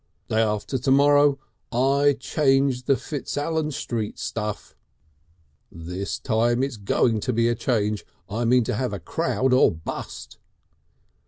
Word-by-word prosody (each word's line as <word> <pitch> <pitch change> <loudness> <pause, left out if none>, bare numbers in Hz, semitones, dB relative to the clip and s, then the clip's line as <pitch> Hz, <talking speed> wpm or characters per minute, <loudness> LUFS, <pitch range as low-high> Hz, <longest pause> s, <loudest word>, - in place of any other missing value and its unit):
Day 110 - +2
after 105 +4 -1
to 135 - -2
morrow 145 +1 +5 0.3
I 140 +3 +3
change 135 -3 +1
the 135 - +4
Fitzallan 150 +3 -3
Street 115 -6 -4
stuff. 105 -2 -5 1.0
This 90 +4 -5
time, 120 +1 +1
it's 135 -4 -3
going 110 +3 +1
to 125 - -2
be 115 0 +2
a 120 - +2
change. 105 -3 -1 0.2
I 115 +4 -2
mean 125 +1 +4
to - - -2
have 125 0 -2
a 100 - -4
crowd 125 +10 0
or 130 - +5
bust!" 80 -1 -7
125 Hz, 140 wpm, -24 LUFS, 105-135 Hz, 1.0 s, morrow